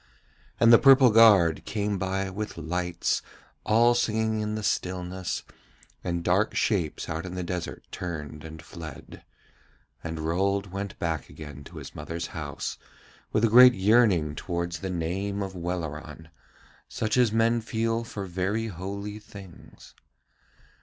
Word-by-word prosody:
And 115 0 +7
the 115 - +9
purple 135 -2 +7
guard 105 -8 +6
came 105 -2 -2
by 95 0 -2
with 105 +3 -5
lights, 90 +2 -1 0.4
all 120 +2 +5
singing 110 -2 0
in 105 0 -2
the 110 - -4
stillness, 90 -1 -2 0.6
and 85 -1 -2
dark 95 +6 +2
shapes 90 -9 0
out 80 +1 -3
in 90 -1 -7
the 90 - -3
desert 90 0 -5
turned 75 -4 -6
and 80 0 -9
fled. 80 -3 -10 0.8
And 80 -1 -4
Rold 95 +4 0
went 100 +1 -5
back 80 -5 -3
again 70 -2 -10
to - - -12
his - - -9
mother's 85 0 -5
house 75 -4 -5 0.5
with 110 - +3
a - - +2
great 125 +2 +8
yearning 95 -6 +3
towards 85 0 -3
the 95 - -4
name 95 +4 -2
of 95 -1 -6
Welleran, 80 -3 -5 0.6
such 110 -1 -1
as 125 -3 +4
men 115 +1 +2
feel 115 0 -1
for 105 -3 -6
very 95 +5 -2
holy 100 +3 -6
things. 100 -4 -14
95 Hz, 140 wpm, -27 LUFS, 85-110 Hz, 0.8 s, the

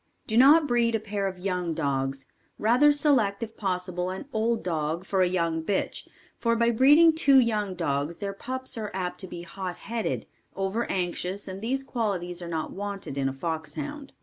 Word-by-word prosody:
Do 220 - -2
not 290 +6 +7
breed 240 -3 +2
a - - +1
pair 205 -2 -2
of 190 -1 -5
young 180 -3 -2
dogs, 135 -3 -1 0.3
rather 250 +7 +5
select 265 -9 +2
if 225 0 -7
possible, 180 -2 -2
an 190 +6 -5
old 225 +1 0
dog 165 0 -2
for 190 -1 +1
a 180 - +4
young 170 -3 0
bitch 195 +3 -2 0.3
for 230 -1 +2
by 235 0 +3
breeding 295 +8 +6
two 280 -4 +5
young 210 -6 +2
dogs 150 -1 -1
their 200 -1 -4
pups 260 +3 -4
are 210 -1 -3
apt 180 -2 -3
to 190 - -4
be 175 -1 -7
hot 180 0 -5
headed, 230 +1 -3 0.3
over 195 +4 -1
anxious 185 +2 -2
and 190 +1 -6
these 265 +4 -1
qualities 190 -9 -2
are 175 - -6
not 160 -2 -3
wanted 200 -6 -5
in 135 -1 0
a - - -5
foxhound. 165 - -5
195 Hz, 185 wpm, -27 LUFS, 175-235 Hz, 0.3 s, not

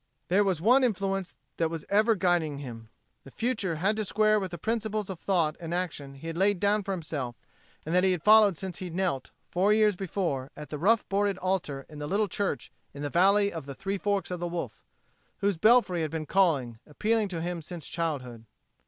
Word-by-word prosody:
There 195 +4 +4
was 190 -5 0
one 245 +9 +5
influence 195 -5 -1 0.2
that 165 -1 +1
was 165 -2 -6
ever 215 +3 +3
guiding 175 -6 +1
him. 115 -5 -8 0.3
The - - -12
future 210 - -2
had 195 +7 +1
to 215 - 0
square 215 +1 +3
to 190 - -2
the 175 -1 -7
principles 215 0 -2
of 180 - -7
thought 165 -5 +1
and 170 0 -4
action 155 -6 -4
he 135 - -12
had 165 +1 -4
laid 200 -1 +3
down 205 +2 +2
for 200 - -9
himself 150 -9 -4 0.5
and 160 - -3
that 180 0 +4
he 190 - +4
had 175 -3 -2
followed 210 -4 +6
since 185 -1 -6
he 185 - -5
knelt, 170 -6 -2 0.2
four 190 +4 +3
years 215 -2 +4
before, 175 -8 -2
at 150 -1 -9
a - - -2
rough 210 +6 +3
boarded 200 -1 +1
altar 180 -8 -2
in 150 -1 -10
a 145 - -3
little 205 +5 +1
church 195 - -2 0.2
in 145 - -6
the 145 - -3
"Valley 200 +3 +4
of 160 -4 -6
the 140 - -6
Three 195 +5 -3
Forks 200 -2 -1
o' 180 - -2
the 175 0 -3
Wolf," 170 0 -5 0.5
whose 200 -3 0
belfry 215 -3 +4
had 155 - -1
been 160 0 -4
calling, 145 -12 +1
appealing 215 +7 0
to 175 -4 -4
him 175 0 -3
since 165 0 -8
childhood. 135 -9 -4
180 Hz, 215 wpm, -28 LUFS, 155-200 Hz, 0.5 s, followed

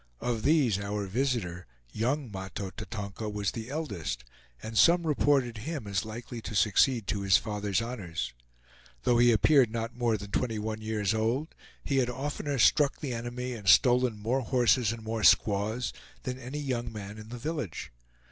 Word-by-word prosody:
Of 120 -2 -2
these 130 -8 +3
our 100 0 -3
visitor, 100 -5 -2 0.2
young 125 - -1
Mahto 95 0 -5
Tatonka, 105 +1 -6
was 105 -1 -1
the 115 +1 -6
eldest, 135 - -4 0.4
and 110 - -6
some 170 - +5
reported 135 -6 +2
him 140 0 -5
as 100 -1 -1
likely 115 +2 -7
to 110 - -6
succeed 110 +3 +3
to 100 +1 -2
his 95 -1 +5
father's 105 0 -1
honors. 95 - -4 0.7
Though 120 -1 +3
he 120 0 +6
appeared 125 +3 +5
not 115 +1 -4
more 120 -3 +1
than 100 -1 -9
twenty 115 -1 -1
one 110 +1 -4
years 110 -2 0
old, 115 +8 -1 0.3
he 140 - 0
had 125 -2 +2
oftener 140 +2 -3
struck 140 +3 +4
the 140 -5 -3
enemy, 120 +2 -4
and 105 -5 -8
stolen 125 +4 +5
more 115 +6 0
horses 120 -2 +3
and 115 -1 -7
more 110 0 -3
squaws 110 +4 +3 0.3
than 130 0 -4
any 130 +3 -6
young 125 -5 -2
man 105 -1 -7
in 110 0 -11
the 120 - -6
village. 130 - -4
115 Hz, 170 wpm, -29 LUFS, 105-125 Hz, 0.7 s, he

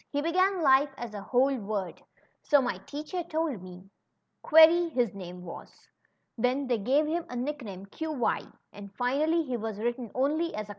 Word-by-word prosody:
He 285 - -1
began 370 +4 +2
life 275 +1 +5
as 240 -3 -6
a 205 - -6
whole 260 +6 +2
word, 200 -5 -4 0.4
so 290 -2 +4
my 245 - -2
teacher 305 +5 -4
told 315 - -2
me; 180 -1 -10
^ 195 - -23 0.5
Query,' 325 +2 +6
his 245 - 0
name 180 -2 -9
was. 170 - -9 0.7
Then 255 +4 +1
they 245 -3 0
gave 270 +9 +2
him 330 +3 -1
a 250 - -6
nickname, 245 -8 -5
^Qy'; 295 +3 -2 0.2
and 200 -1 -10
finally 305 +7 +1
he 255 -5 -3
was 220 -2 -5
written 235 +1 -3
only? 310 +6 0
265 Hz, 165 wpm, -28 LUFS, 220-310 Hz, 0.7 s, Query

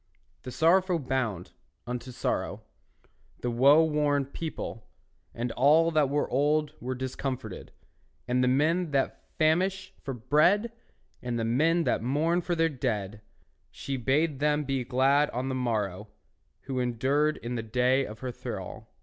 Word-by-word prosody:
The 125 - -8
sorrowful, 180 +5 +3
bound 125 - -2 0.3
unto 125 +1 -5
sorrow, 120 - -3 0.8
The 120 - -1
woe 140 +7 +6
worn 150 -3 +1
people, 140 -6 -6 0.4
and 120 +1 -3
all 150 +7 +4
That 155 -2 +3
of 145 0 +1
old 150 +3 +1
were 130 +1 -3
discomforted, 130 0 -5 0.6
And 125 +1 +2
men 165 +4 +1
that 135 -1 0 0.2
famish 185 +4 +1
for 135 -2 -5
bread, 155 - +3 0.5
And 120 -1 -3 0.2
men 165 +4 +3
that - - 0
mourn 155 +8 +1
for 175 0 -2
their 165 0 +3
dead, 105 -8 -3 0.5
She 135 - -5
bade 135 +3 +1
them 150 +1 +1
be 135 -2 -1
glad 135 +4 +3
on 130 +2 -3
the - - -2
morrow, 110 -5 -2 0.5
Who 130 -1 -4
endured 135 +5 +1
in 120 +1 -5
the 120 - -2
day 125 +4 +2
of 110 -3 -8
her 130 -1 -3
thrall. - - -7
135 Hz, 140 wpm, -28 LUFS, 125-155 Hz, 0.8 s, woe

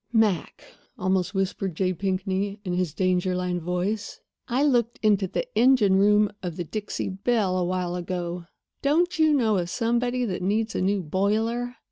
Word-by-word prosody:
"Mac," 220 -6 +1 0.3
almost 185 +1 0
whispered 190 -2 -1
J. 185 +1 0
Pinkney, 195 +2 -2
in 180 - -2
his 180 -3 0
danger 185 +1 0
line 180 -1 -1
voice, 180 +5 -3 0.3
"I 255 +3 +1
looked 240 -5 +2
into 205 -3 +3
the - - -2
engine 240 -6 +5
room 210 +1 +4
of 175 -3 -4
the 175 - -3
Dixie 210 +5 -4
Belle 195 0 0
a 185 - +1
while 180 -1 -2
ago. 175 -1 -4 0.4
Don't 340 +5 +1
you 315 -1 +5
know 225 -8 +3
of 175 -1 -2
somebody 245 +3 0
that 185 -5 -3
needs 215 +4 0
a - - -1
new 195 0 +1
boiler? 220 +8 0
195 Hz, 165 wpm, -25 LUFS, 180-225 Hz, 0.4 s, engine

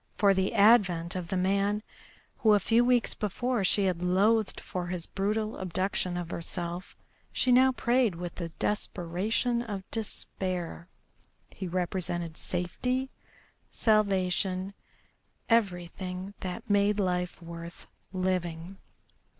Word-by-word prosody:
For 200 -1 +5
the 190 +3 0
advent 195 -6 +5
of 180 -2 -3
the 190 - -1
man 200 +3 +1 0.6
who 215 -2 +5
a - - +4
few 230 +3 +3
weeks 245 -1 +3
before 230 +2 -1
she 200 +2 +3
had 180 -2 0
loathed 200 +4 +2
for 180 -1 -4
his 175 -2 -3
brutal 215 +3 -1
abduction 185 0 -1
of 175 -1 -4
herself 175 +2 -5 0.4
she 255 - +2
now 260 +1 +6
prayed 245 -5 +2
with 175 0 -5
the 170 -2 -5
desperation 210 +6 -1
of 205 -5 -5
despair. 185 -5 -4 0.6
He 190 - -6
represented 175 -2 -2
safety, 250 +12 -2 0.6
salvation, 195 -3 +1 0.8
everything 185 -3 0
that 180 -1 -5
made 205 0 +3
life 180 -2 -1
worth 170 0 -9 0.3
living. 185 -1 -2
190 Hz, 120 wpm, -29 LUFS, 175-215 Hz, 0.8 s, now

